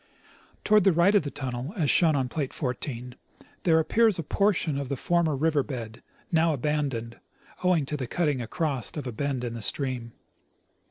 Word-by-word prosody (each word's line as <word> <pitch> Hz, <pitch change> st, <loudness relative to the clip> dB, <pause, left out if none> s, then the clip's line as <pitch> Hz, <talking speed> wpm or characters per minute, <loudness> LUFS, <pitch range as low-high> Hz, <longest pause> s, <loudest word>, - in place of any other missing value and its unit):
Toward 210 Hz, -1 st, +5 dB
the 195 Hz, -, +5 dB
right 175 Hz, +5 st, +4 dB
of 205 Hz, -, +5 dB
the 145 Hz, -, -4 dB
tunnel, 130 Hz, -, -5 dB
as 155 Hz, -6 st, +3 dB
shown 160 Hz, -4 st, +4 dB
on 135 Hz, -2 st, 0 dB
plate 140 Hz, +1 st, -3 dB
14, 125 Hz, -2 st, -4 dB, 0.5 s
there 165 Hz, -2 st, +5 dB
appears 215 Hz, +6 st, +3 dB
a 165 Hz, -, -3 dB
portion 170 Hz, -4 st, +1 dB
of 140 Hz, -2 st, -4 dB
the 140 Hz, -, -1 dB
former 165 Hz, +2 st, +1 dB
river 150 Hz, +1 st, +2 dB
bed, 120 Hz, -5 st, -6 dB, 0.3 s
now 165 Hz, -1 st, +3 dB
abandoned, 135 Hz, -5 st, -2 dB, 0.4 s
owing 180 Hz, -5 st, +3 dB
to 150 Hz, +2 st, -3 dB
the 130 Hz, -3 st, -4 dB
cutting 150 Hz, -4 st, 0 dB
across 135 Hz, +2 st, -2 dB
of 145 Hz, -, -4 dB
a 125 Hz, -, -3 dB
bend 135 Hz, +2 st, -2 dB
in 120 Hz, -1 st, -3 dB
the 115 Hz, -, -6 dB
stream. 125 Hz, -1 st, -2 dB
145 Hz, 180 wpm, -27 LUFS, 125-165 Hz, 0.5 s, Toward